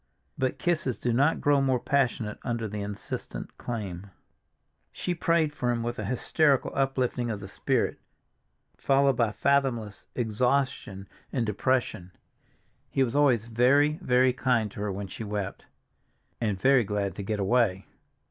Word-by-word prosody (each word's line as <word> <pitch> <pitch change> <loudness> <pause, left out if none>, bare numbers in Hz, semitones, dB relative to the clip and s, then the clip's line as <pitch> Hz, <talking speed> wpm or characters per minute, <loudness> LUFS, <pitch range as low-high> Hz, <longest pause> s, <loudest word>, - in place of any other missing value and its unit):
But 130 -1 -1
kisses 155 -8 0
do 120 - -1
not 140 +6 +2
grow 145 -1 +3
more 130 -2 +2
passionate 125 -6 0
under 115 -2 -2
the 105 0 -5
insistent 100 0 -6
claim. 100 -5 -5 0.8
She 180 - -3
prayed 165 -3 +1
for 125 -4 -2
him 120 -1 0
with 120 +1 -3
a - - -3
hysterical 140 +2 +2
uplifting 130 -3 0
of 105 -3 -3
the 100 - -8
spirit, - - -1 0.8
followed 135 -1 +3
by 115 -2 +1
fathomless 125 -5 0
exhaustion 120 -3 -1 0.2
and 125 -4 0
depression. 105 -4 -1 0.8
He 135 - +2
was 125 +1 -2
always 130 -7 +3
very, 140 +7 +3
very 125 -4 +3
kind 120 -5 +1
to - - -10
her 105 -1 -2
when 100 +1 -4
she 95 +4 -7
wept—and 105 0 -6
very 130 +3 +5
glad 100 -1 -2
to - - -3
get 105 +1 -2
away. 100 -2 +2
120 Hz, 145 wpm, -27 LUFS, 105-135 Hz, 0.8 s, very